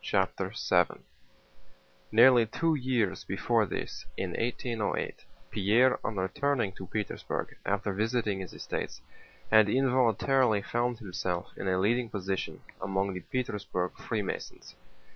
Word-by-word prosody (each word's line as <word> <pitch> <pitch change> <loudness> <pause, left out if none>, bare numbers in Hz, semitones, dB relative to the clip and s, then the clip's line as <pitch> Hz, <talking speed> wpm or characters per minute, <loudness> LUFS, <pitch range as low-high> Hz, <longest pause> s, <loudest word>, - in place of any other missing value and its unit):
CHAPTER 95 -1 0 0.2
VII 90 -1 +3 1.1
Nearly 120 +1 +7
two 165 +8 +1
years 125 -8 0
before 110 +3 +1
this, - - -4
in - - -2
1808, 115 -2 -2 0.3
Pierre 115 +6 +4
on 105 - -2
returning 115 +4 0
to 95 0 -9
Petersburg 105 -2 -3
after 100 0 0
visiting 110 -1 0
his 95 -3 -6
estates - - -4 0.5
had 110 -1 +7
involuntarily 125 -2 +3
found 120 +2 0
himself 90 -4 -4
in - - -4
a 95 -1 +2
leading 115 +5 +2
position 95 -2 -3 0.2
among 95 0 0
the 90 - -4
Petersburg 100 -4 -2
Freemasons. 105 -4 -4
105 Hz, 120 wpm, -30 LUFS, 95-120 Hz, 1.1 s, Nearly